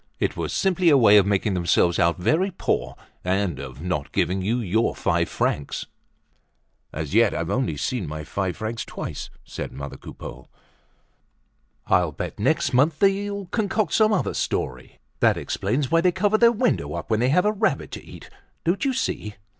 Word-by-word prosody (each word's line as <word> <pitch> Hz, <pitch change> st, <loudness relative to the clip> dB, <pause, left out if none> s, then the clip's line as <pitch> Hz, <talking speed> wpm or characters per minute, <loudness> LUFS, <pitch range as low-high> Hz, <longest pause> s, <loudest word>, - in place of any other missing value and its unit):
It -, -, 0 dB
was -, -, -3 dB
simply 185 Hz, -2 st, +2 dB
a 145 Hz, -, +6 dB
way 105 Hz, -5 st, +7 dB
of 100 Hz, -1 st, +5 dB
making 100 Hz, 0 st, +1 dB
themselves 85 Hz, -1 st, +2 dB
out 85 Hz, -1 st, +3 dB
very 155 Hz, -, +1 dB
poor 65 Hz, -, -2 dB, 0.3 s
and 95 Hz, 0 st, 0 dB
of 65 Hz, +2 st, -8 dB
not 90 Hz, -6 st, -2 dB
giving 95 Hz, +2 st, 0 dB
you 110 Hz, +6 st, 0 dB
your 110 Hz, 0 st, 0 dB
five -, -, 0 dB
francs." 70 Hz, -, -2 dB, 1.1 s
"As 75 Hz, -1 st, -5 dB
yet 115 Hz, -1 st, +4 dB
I've 85 Hz, -1 st, -2 dB
only 125 Hz, -, 0 dB
seen 95 Hz, -, -2 dB
my 75 Hz, 0 st, -5 dB
five 95 Hz, +2 st, -3 dB
francs 110 Hz, +1 st, -3 dB
twice," -, -, -6 dB, 0.2 s
said -, -, -6 dB
mother 70 Hz, +1 st, -7 dB
Coupeau. 65 Hz, +2 st, -10 dB, 1.4 s
"I'll -, -, +2 dB
bet -, -, -6 dB
next -, -, +1 dB
month 145 Hz, +5 st, +3 dB
they'll 200 Hz, 0 st, +1 dB
concoct 210 Hz, +2 st, -1 dB
some 215 Hz, 0 st, +4 dB
other 205 Hz, -, 0 dB
story. 65 Hz, 0 st, -3 dB, 0.2 s
That -, -, +4 dB
explains 135 Hz, +2 st, -2 dB
why 165 Hz, 0 st, +4 dB
they 180 Hz, +1 st, +3 dB
cover 205 Hz, +3 st, +1 dB
their 235 Hz, -1 st, +7 dB
window 240 Hz, +2 st, 0 dB
up -, -, -6 dB
when 110 Hz, -, +2 dB
they 125 Hz, +2 st, +2 dB
have 180 Hz, +7 st, +3 dB
a 210 Hz, -, +4 dB
rabbit 215 Hz, +1 st, -1 dB
to -, -, -7 dB
eat. -, -, -12 dB, 0.4 s
Don't 175 Hz, +3 st, 0 dB
you 270 Hz, -2 st, +1 dB
see? 105 Hz, -, -3 dB
115 Hz, 180 wpm, -24 LUFS, -, 1.4 s, way